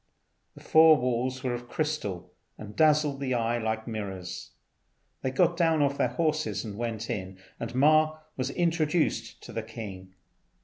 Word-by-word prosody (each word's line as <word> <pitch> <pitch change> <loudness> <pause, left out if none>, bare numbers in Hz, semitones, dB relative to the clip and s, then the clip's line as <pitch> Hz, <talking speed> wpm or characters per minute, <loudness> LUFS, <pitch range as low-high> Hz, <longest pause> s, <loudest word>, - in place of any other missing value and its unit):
The - - -14
four 160 0 +7
walls 125 +1 -1
were 125 -2 0
of 120 0 -6
crystal, 150 - -3 0.2
and 105 -1 -9
dazzled 150 -3 +3
the 130 -2 -1
eye 120 0 0
like 110 0 -2
mirrors. 95 -5 -5 0.7
They 130 - -1
got 175 +5 +2
down 165 -3 +3
off 140 0 0
their - - +3
horses 155 +2 -1
and 105 -2 -6
went 115 -1 -3
in, 95 -1 -4 0.2
and 115 +1 -5
Ma 155 +3 +4 0.2
was 130 0 -2
introduced 155 -7 0
to - - -10
the 115 - -2
king. 100 -4 -9
125 Hz, 160 wpm, -28 LUFS, 110-155 Hz, 0.7 s, four